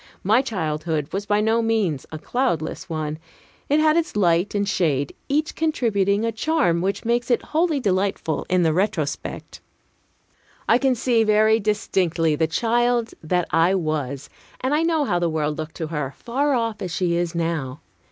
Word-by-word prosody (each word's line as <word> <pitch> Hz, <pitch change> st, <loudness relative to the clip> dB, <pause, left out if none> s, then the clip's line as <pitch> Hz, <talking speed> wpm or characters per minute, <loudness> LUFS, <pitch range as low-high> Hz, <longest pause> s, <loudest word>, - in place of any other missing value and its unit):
My 220 Hz, +6 st, +4 dB
childhood 155 Hz, -, -3 dB
was 200 Hz, +2 st, -3 dB
by 205 Hz, 0 st, +2 dB
no 225 Hz, +2 st, +2 dB
means 215 Hz, -, 0 dB
a 155 Hz, -, -5 dB
cloudless 170 Hz, -, -2 dB
one. 155 Hz, -1 st, -3 dB, 0.5 s
It 295 Hz, +2 st, +4 dB
had 310 Hz, 0 st, +4 dB
its 335 Hz, -7 st, 0 dB
light 180 Hz, 0 st, +2 dB
and 200 Hz, 0 st, 0 dB
shade, 145 Hz, -8 st, 0 dB, 0.2 s
each 300 Hz, +2 st, 0 dB
contributing 220 Hz, -9 st, +1 dB
a 230 Hz, -, 0 dB
charm 225 Hz, -, +1 dB
which 195 Hz, +4 st, -2 dB
makes 240 Hz, +1 st, 0 dB
it 240 Hz, -, +2 dB
wholly 320 Hz, -2 st, +2 dB
delightful 190 Hz, -, -1 dB
in 185 Hz, -1 st, +3 dB
the 160 Hz, -1 st, +2 dB
retrospect. 175 Hz, -5 st, -3 dB, 1.1 s
I 230 Hz, -, +4 dB
can 265 Hz, -2 st, +2 dB
see 235 Hz, -1 st, +2 dB
very 215 Hz, +1 st, +4 dB
distinctly 180 Hz, -6 st, 0 dB
the 160 Hz, +1 st, +1 dB
child 235 Hz, +5 st, +1 dB
that 175 Hz, +2 st, 0 dB
I 170 Hz, +4 st, +3 dB
was, 150 Hz, -6 st, -2 dB, 0.3 s
and 260 Hz, +3 st, -1 dB
I 300 Hz, -, +2 dB
know 325 Hz, -3 st, +1 dB
how 175 Hz, -8 st, 0 dB
the 170 Hz, -1 st, +1 dB
world 155 Hz, -1 st, -2 dB
looked 155 Hz, 0 st, -6 dB
to 160 Hz, -, -4 dB
her, 150 Hz, -4 st, -3 dB
far 275 Hz, +4 st, 0 dB
off 230 Hz, -3 st, -2 dB
as 180 Hz, -, -4 dB
she 175 Hz, 0 st, 0 dB
is 175 Hz, 0 st, -1 dB
now. 165 Hz, -4 st, -2 dB
195 Hz, 170 wpm, -23 LUFS, 160-235 Hz, 1.1 s, My